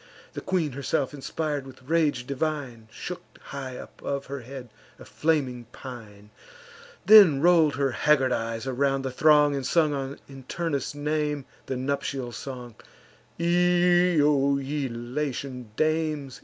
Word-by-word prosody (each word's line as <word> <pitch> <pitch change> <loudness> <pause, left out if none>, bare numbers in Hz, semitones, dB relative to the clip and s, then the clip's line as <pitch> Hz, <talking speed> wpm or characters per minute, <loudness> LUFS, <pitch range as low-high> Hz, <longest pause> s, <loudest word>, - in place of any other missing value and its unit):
The - - -5
queen 175 -6 0
herself, 135 0 -1
inspir'd 145 0 -3
with 130 0 -14
rage 155 -6 +1
divine, 140 -5 -3
Shook - - -6 0.2
high 135 -2 -7
above 140 +2 -6
her 140 +1 -5
head 125 0 -9 0.3
a - - -13
flaming 135 -7 -1
pine; 110 -4 -11 0.7
Then 200 -10 +8
roll'd 165 -2 +4
her 140 -2 +1
haggard 135 -1 +3
eyes 115 0 -2
around 135 +1 0
the 130 - -3
throng, 150 +1 +4
And 135 - -3
sung, 140 -2 0
in 135 -2 -12
Turnus' 145 -3 -3
name, 150 -1 -1 0.2
the 130 - -2
nuptial 135 -1 -2
song: 125 -1 -7 0.7
"Io, 175 -5 +3
ye 140 0 -2
Latian 125 0 -4
dames! 155 -3 -1
140 Hz, 130 wpm, -26 LUFS, 130-155 Hz, 0.7 s, Then